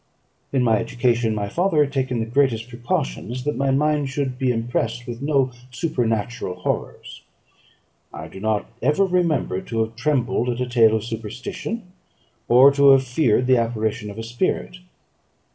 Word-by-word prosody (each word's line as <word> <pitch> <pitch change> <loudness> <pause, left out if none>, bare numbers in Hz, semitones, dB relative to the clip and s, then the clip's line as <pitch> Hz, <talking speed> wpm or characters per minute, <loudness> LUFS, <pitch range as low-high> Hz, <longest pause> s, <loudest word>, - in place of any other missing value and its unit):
In 135 -2 +1
my 115 -2 +3
education 120 -1 0
my 100 -1 -2
father 165 - +2
had 140 -1 -5
taken 130 -3 -1
the 115 - -1
greatest 120 -1 +1
precautions 120 - -3
that 150 - -1
my 135 +2 0
mind 145 +1 +1
should 130 -2 -3
be 130 -2 +2
impressed 115 0 -2
with 120 0 -7
no 140 -3 +1 0.2
supernatural 120 - -2
horrors. - - -4 0.9
I - - -8
do 95 - -11
not 110 0 0 0.2
ever 150 +10 +3
remember 165 - 0
to 115 -1 -2
have 110 0 -3
trembled 125 -2 0
at 120 0 -2
a 125 - 0
tale 115 -3 +4
of 110 - -2
superstition, 115 - -5 0.6
or 130 +4 +7
to 140 0 +5
have 135 0 +4
feared 125 -2 +1
the 130 0 +4
apparition 110 -2 -1
of 100 - -9
a 115 - -5
spirit. 120 +9 -2
125 Hz, 160 wpm, -22 LUFS, 115-140 Hz, 0.9 s, or